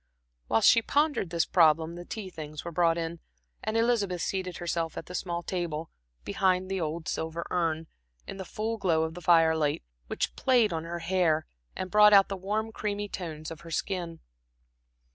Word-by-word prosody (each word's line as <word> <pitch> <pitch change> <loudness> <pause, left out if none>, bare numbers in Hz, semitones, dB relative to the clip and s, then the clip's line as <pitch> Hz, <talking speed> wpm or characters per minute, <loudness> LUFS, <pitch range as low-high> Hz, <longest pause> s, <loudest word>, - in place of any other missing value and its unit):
While 110 - +2
she 230 - +6
pondered 290 - +1
this 170 -1 +1
problem 160 -1 +4
the 175 0 -8
tea 195 -2 -6
things 155 -2 -8
were 170 - -4
brought 170 0 +2
in, 165 0 -4 0.4
and 215 +1 -1
Elizabeth 215 -7 +1
seated 185 -2 -3
herself 170 -2 -2
at - - -5
the 180 - -10
small 175 -1 -3
table, 165 -4 -3 0.3
behind 185 0 +1
the 190 -2 -1
old 160 +1 -3
silver 160 +1 -3
urn, 165 -2 0 0.4
in - - -7
the 190 - -5
full 225 +3 -3
glow 170 -6 +2
of 160 0 -3
the 180 - -9
firelight, 160 - +3 0.2
which - - -2
played 245 -7 +3
on 160 0 -3
her 170 +1 -4
hair 170 -4 +2 0.3
and 185 0 -5
brought 210 0 +7
out 195 -1 +7
the 195 - -2
warm 210 +4 -2
creamy 205 -1 -3
tones 160 -5 -6
of 160 - -9
her 170 - -11
skin. 170 0 -3
175 Hz, 180 wpm, -28 LUFS, 165-195 Hz, 0.4 s, brought